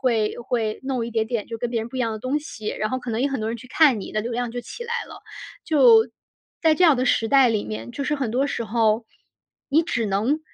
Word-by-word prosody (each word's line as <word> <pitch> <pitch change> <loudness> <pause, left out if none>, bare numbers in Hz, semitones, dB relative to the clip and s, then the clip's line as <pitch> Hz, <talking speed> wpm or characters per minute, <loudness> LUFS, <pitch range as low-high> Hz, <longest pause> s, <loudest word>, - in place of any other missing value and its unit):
会 225 -5 +1
会 230 -3 -2
弄 260 -3 -2
一 - - -6
点 220 -1 0
点 225 -2 -3
就 230 - -6
跟 240 - -2
别 235 -1 -1
人 225 - -6
不 260 - -7
一 - - -2
样 235 -3 0
的 220 - -5
东 255 +6 -1
西， 235 -8 -7
然 215 - -2
后 255 - -2
可 250 -1 -6
能 225 +1 -1
也 275 - +2
很 270 - -2
多 215 +1 -2
人 235 - -3
去 255 - -13
看， 265 -5 +4
你 - - -7
的 215 - -1
流 235 +2 -4
量 240 0 -2
就 245 - -5
起 475 - -8
来 470 0 -3
了。 - - -11 0.4
就， 250 -7 +6 0.5
在 320 -1 +5
这 365 - 0
样 315 -5 +6
的 250 - 0
时 225 -3 +2
代 270 -2 +5
里 215 -2 0
面， 110 +2 -6
就 - - -5
是 295 - 0
很 270 -6 -2
多 260 +5 +1
时 235 - -3
候， 220 0 +1 0.6
你 305 +4 +4
只 245 -9 -1
能 215 +10 0
240 Hz, 295 characters per minute, -23 LUFS, 220-270 Hz, 0.6 s, 就